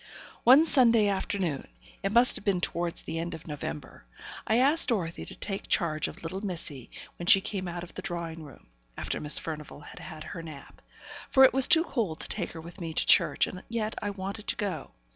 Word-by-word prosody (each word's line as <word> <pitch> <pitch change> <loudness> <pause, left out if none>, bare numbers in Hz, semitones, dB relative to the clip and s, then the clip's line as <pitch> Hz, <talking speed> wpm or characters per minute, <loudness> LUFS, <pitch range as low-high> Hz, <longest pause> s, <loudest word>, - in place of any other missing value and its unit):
One 265 +7 +8
Sunday 235 -8 +4
afternoon 190 -6 -2 0.3
it 195 - -1
must 240 +3 +6
have - - -6
been 200 -3 +1
towards 170 -1 -2
the 165 0 -4
end 170 +1 -3
of 160 - -12
November 140 - -7 0.4
I 220 - +3
asked 285 +6 +4
Dorothy 175 -8 -2
to - - -5
take 195 -2 -5
charge 155 -3 0
of 175 - -10
little 185 +4 -4
missy 165 - -3 0.3
when 175 - -7
she 195 - +8
came 195 -2 -4
out 175 0 -5
of 175 - -11
the - - -6
drawing 165 -2 -5
room, 145 -3 -13 0.3
after - - -3
Miss 150 0 +1
Furnivall 150 -2 -6
had - - -11
had 155 -4 -9
her 165 - -7
nap; 155 -4 -11 0.5
for 265 - +6
it - - +4
was 265 0 +4
too 325 - +6
cold 220 - -2
to - - 0
take 185 -5 -2
her 165 - -8
with 170 +4 -11
me 165 -2 -5
to - - +2
church, - - +4
and 185 - -8
yet 220 -1 -2
I 205 - -2
wanted 200 +2 -6
to - - +1
go. 200 -3 -4
185 Hz, 215 wpm, -28 LUFS, 165-215 Hz, 0.5 s, One